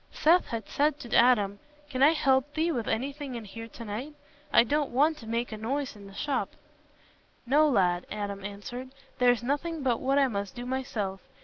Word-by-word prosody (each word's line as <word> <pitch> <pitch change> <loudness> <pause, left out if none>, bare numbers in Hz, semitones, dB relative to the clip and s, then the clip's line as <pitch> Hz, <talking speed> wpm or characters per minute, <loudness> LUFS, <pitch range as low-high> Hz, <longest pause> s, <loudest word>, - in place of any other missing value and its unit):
Seth 340 +4 +4
had 230 -4 -4
said 295 0 +1
to 240 -5 -4
Adam, 210 -5 +4 0.3
"Can 260 -3 -4
I 295 +4 +7
help 275 -2 +2
thee 325 +2 +1
with 240 -7 -2
anything 270 +3 -3
in 230 -2 -6
here 225 +3 -8
to 230 +1 -10
night? 245 +9 -5 0.4
I - - +7
don't 290 +4 0
want 300 +5 +2
to 225 - -11
make 235 +2 -2
a 215 - -5
noise 265 +5 -2
in 200 -1 -12
the 195 - -13
shop." 285 +4 -2 0.9
"No, 300 +5 +4
lad," 180 -7 +2
Adam 200 -2 -4
answered, 205 +6 -7 0.3
"there's 245 -1 +4
nothing 295 +4 -2
but 245 -3 +1
what 270 +2 +2
I 275 -1 +5
must 200 -4 -4
do 245 0 -6
myself. 220 -7 -3
245 Hz, 195 wpm, -28 LUFS, 215-285 Hz, 0.9 s, I